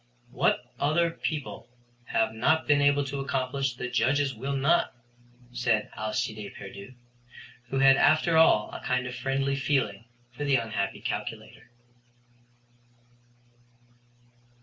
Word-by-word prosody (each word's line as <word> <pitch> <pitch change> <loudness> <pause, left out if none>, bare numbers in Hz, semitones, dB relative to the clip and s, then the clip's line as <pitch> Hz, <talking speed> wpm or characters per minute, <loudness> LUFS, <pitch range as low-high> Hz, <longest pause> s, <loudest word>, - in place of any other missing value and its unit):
"What 125 - +1 0.2
other 165 +3 +2
people 145 -7 -5 0.4
have 110 -1 0
not 150 +8 +2
been 145 -1 +4
able 145 0 +3
to 140 +1 -4
accomplish 135 -1 -2
the 125 - -4
Judges 135 +3 +1
will 135 +4 -4
not," 140 +1 +2 0.6
said 120 -3 0
Alcide 110 -1 -3
Pierdeux, 100 +5 -10 0.7
who 135 - -2
had 135 0 +6
after 155 +2 +3
all 160 -9 +4
a - - -7
kind 125 0 0
of 125 - -5
a - - -7
friendly 135 +2 -1
feeling 130 -6 -1 0.3
for 125 +4 -6
the 140 -2 +2
unhappy 110 -5 -2
calculator. - - -6
135 Hz, 125 wpm, -27 LUFS, 120-140 Hz, 0.7 s, had